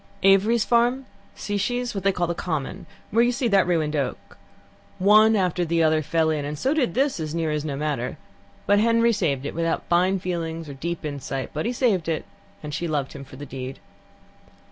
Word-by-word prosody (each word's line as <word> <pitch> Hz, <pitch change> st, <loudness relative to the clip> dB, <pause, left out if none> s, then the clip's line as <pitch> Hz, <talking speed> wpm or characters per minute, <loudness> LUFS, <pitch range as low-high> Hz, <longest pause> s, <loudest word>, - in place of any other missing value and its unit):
Avery's 200 Hz, +4 st, +4 dB
Farm, 245 Hz, +3 st, +2 dB, 0.3 s
Sishe's 240 Hz, +5 st, -2 dB
what 195 Hz, -2 st, -4 dB
they 195 Hz, -, +4 dB
call 180 Hz, -2 st, -1 dB
the 170 Hz, -, -1 dB
Common, 155 Hz, -5 st, -4 dB, 0.2 s
where 230 Hz, +3 st, +4 dB
you 240 Hz, -, +3 dB
see 250 Hz, 0 st, -1 dB
that 195 Hz, -3 st, +4 dB
ruined 155 Hz, -3 st, +1 dB
oak 140 Hz, -4 st, -3 dB, 0.6 s
one 215 Hz, +3 st, +6 dB
after 180 Hz, -3 st, +1 dB
the 165 Hz, 0 st, +1 dB
other 155 Hz, 0 st, +3 dB
fell 160 Hz, +1 st, +1 dB
in, 150 Hz, -2 st, -1 dB
and 145 Hz, +1 st, -4 dB
so 265 Hz, -, +1 dB
did 265 Hz, -, 0 dB
this, 270 Hz, -6 st, +1 dB
as 155 Hz, 0 st, -4 dB
near 165 Hz, -2 st, 0 dB
as 150 Hz, -, 0 dB
is 150 Hz, -, -4 dB
no 145 Hz, -3 st, -3 dB
matter. 140 Hz, -4 st, -2 dB, 0.5 s
"But 205 Hz, 0 st, +4 dB
Henry 230 Hz, +1 st, +3 dB
had 230 Hz, -, +2 dB
saved 145 Hz, -8 st, 0 dB
it; -, -, -4 dB
without 165 Hz, 0 st, -1 dB
fine 180 Hz, +3 st, +3 dB
feelings 165 Hz, -3 st, -4 dB
or 140 Hz, -, -7 dB
deep 165 Hz, +4 st, -4 dB
insight, 135 Hz, -2 st, -4 dB
but 155 Hz, +7 st, -2 dB
he -, -, 0 dB
had -, -, -6 dB
saved 195 Hz, -10 st, +1 dB
it, 160 Hz, -, -2 dB, 0.4 s
and 150 Hz, -1 st, -6 dB
she 170 Hz, +3 st, -2 dB
loved 145 Hz, -4 st, -2 dB
him 140 Hz, -, -8 dB
for 130 Hz, -, -13 dB
the 145 Hz, +2 st, -8 dB
deed. 130 Hz, 0 st, -6 dB
170 Hz, 215 wpm, -24 LUFS, 150-205 Hz, 0.6 s, one